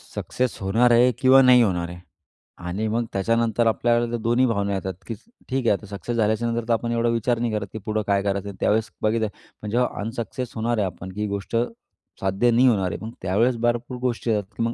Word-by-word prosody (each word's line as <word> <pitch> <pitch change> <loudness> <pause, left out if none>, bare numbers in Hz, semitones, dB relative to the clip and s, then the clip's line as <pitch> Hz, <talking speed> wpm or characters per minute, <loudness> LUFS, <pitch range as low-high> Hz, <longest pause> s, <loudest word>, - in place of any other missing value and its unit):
Success 125 -1 -2
होणार 115 +6 +3
आहे 120 +2 +5
किंवा 135 0 +7
नाही 125 -1 +7
होणार 90 -5 0
आहे. 90 0 -9 0.6
आणि 90 +5 -3
मग 115 +2 0
त्याच्यानंतर 115 +3 +1
आपल्याला 120 +1 +2
तर - - -1
दोन्ही 120 +3 +2
भावना 100 -4 0
येतात 95 0 -3
की 115 - -3 0.4
ठीक 130 -2 -1
आहे. - - +5
आता 105 - -5
सक्सेस 100 +4 -5
झाल्याच्या 110 +1 +1
नंतर 115 0 -1
तर 115 - +3
आपण 115 +1 -1
एवढा 115 0 +1
विचार 115 +1 0
नाही, 120 -1 -1
करत 105 -2 -2
की 110 - -5
पुढं 110 0 0
काय 100 -1 +2
करायचं 100 0 -1
आहे, 100 - -9
त्यावेळेस 110 +1 +1
बघितलं 110 +1 +1 0.3
पण 105 - -5
जेव्हा 125 +3 +2
अनसक्सेस 115 +2 -4
होणार 115 +1 -1
आहे 105 - +1
आपण, 90 +1 -7
की 105 +3 -6
ही 105 - 0
गोष्ट 100 +2 -4 0.6
साध्य 95 +5 +1
नाही 125 +3 +5
होणार 100 -6 +2
आहे. - - -4
पण 110 - -6
त्यावेळेस 115 +7 +1
भरपूर 120 +1 -1
गोष्टी 120 -2 -1
येतात, 105 -2 +1
की 115 - 0
मग 115 +1 0
115 Hz, 225 wpm, -23 LUFS, 100-120 Hz, 0.6 s, किंवा